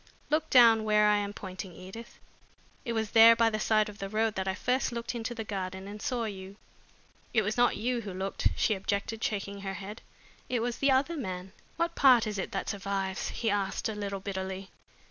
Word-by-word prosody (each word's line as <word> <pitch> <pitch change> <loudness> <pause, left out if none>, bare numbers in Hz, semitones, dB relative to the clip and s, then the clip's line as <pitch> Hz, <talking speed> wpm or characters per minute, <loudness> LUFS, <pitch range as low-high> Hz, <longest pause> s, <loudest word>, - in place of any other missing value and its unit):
Look 310 +1 +1
down 230 -3 +7
where 210 -1 +4
I 210 0 +4
am 205 0 -2
pointing, 185 -2 -8
Edith. 190 +7 -10 0.7
It 235 - -2
was 220 -2 -2
there 230 0 +8
by 230 0 +3
the 215 - -2
side 215 0 +2
of 210 -1 -10
the 195 - -4
road 220 +1 +1
that 190 -2 -3
I 190 - 0
first 250 +5 0
looked 235 0 -4
into 235 0 -4
the 225 - -4
garden 190 -2 -5
and 205 +1 -8
saw 245 0 -1
you." 195 -2 -7 0.8
"It 220 - +4
was 210 +2 -1
not 245 0 +3
you 245 +1 -1
who 205 -3 -6
looked," 190 +1 -1
she 220 - +2
objected, 200 +3 -3
shaking 200 -1 -3
her 195 -1 -4
head. 205 +3 -8 0.5
"It 245 -2 0
was 240 +1 -2
the 275 - +3
other 275 +5 +2
man." 185 - -5 0.2
"What 335 +1 -1
part 255 -7 +6
is 210 -2 -3
it - - -4
that 195 - -3
survives?" 195 -1 -2
he 225 -3 -1
asked, 200 +1 -1
a - - -3
little 200 -1 -4
bitterly. 190 -1 -5
210 Hz, 210 wpm, -29 LUFS, 195-230 Hz, 0.8 s, there